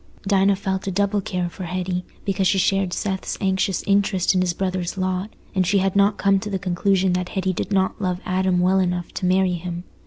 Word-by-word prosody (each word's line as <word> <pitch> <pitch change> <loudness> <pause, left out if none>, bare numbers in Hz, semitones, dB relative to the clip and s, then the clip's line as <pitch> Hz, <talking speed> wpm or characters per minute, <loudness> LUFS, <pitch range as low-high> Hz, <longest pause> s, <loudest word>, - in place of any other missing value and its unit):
Dinah 195 0 +4
felt 190 0 -3
a - - 0
double 200 +2 +1
care 180 -2 -2
for 180 +2 -7
Hetty, 180 +1 -2 0.2
because 195 -1 +1
she 195 - +2
shared 195 0 +1
Seth's 190 0 -3
anxious 190 -1 0
interest 195 -2 +2
in 185 - +2
his 180 -1 +1
brother's 185 -1 -2
lot, 185 +2 -1 0.2
and 190 -2 +2
she 195 +3 +2
had 195 0 +1
not 200 +1 +3
come 195 -1 +3
to 210 - -6
the 195 - -1
conclusion 185 +1 +1
that 180 0 -1
Hetty 190 -1 -1
did 195 - -4
not 190 +1 +1
love 180 -2 -1
Adam 185 0 +1
well 185 +2 +3
enough 180 -2 -1
to 180 - -2
marry 185 0 +3
him. 175 0 -5
190 Hz, 215 wpm, -22 LUFS, 180-195 Hz, 0.2 s, Dinah